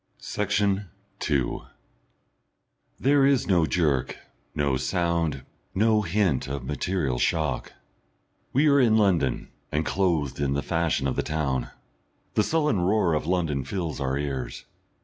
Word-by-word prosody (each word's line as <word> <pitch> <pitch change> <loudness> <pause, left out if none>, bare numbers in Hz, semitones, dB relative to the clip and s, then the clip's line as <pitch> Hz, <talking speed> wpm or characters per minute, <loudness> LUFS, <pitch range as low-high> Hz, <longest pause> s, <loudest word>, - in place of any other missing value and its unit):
Section 100 -1 0 0.3
2 70 -6 0 1.4
There 140 +1 +4
is 135 -2 +3
no 85 -5 +3
jerk, 75 -8 0 0.4
no 70 -2 +1
sound, 80 +1 -1 0.3
no 110 +2 +3
hint 95 -7 0
of 70 -1 -4
material 75 -1 -1
shock. 80 -4 0 0.8
We 145 +4 +3
are 140 -1 +5
in 115 -4 +4
London, 90 - +1 0.2
and 75 +1 0
clothed 85 -9 0
in 70 -1 +1
the 70 - -1
fashion 80 -4 0
of 65 - -1
the - - +2
town. 70 -4 -2 0.6
The - - +3
sullen 150 - +1
roar 95 -2 +2
of 75 0 -1
London 80 -6 0
fills 85 -2 -4
our 65 0 0
ears.... 65 -4 -4
85 Hz, 130 wpm, -26 LUFS, 70-100 Hz, 1.4 s, are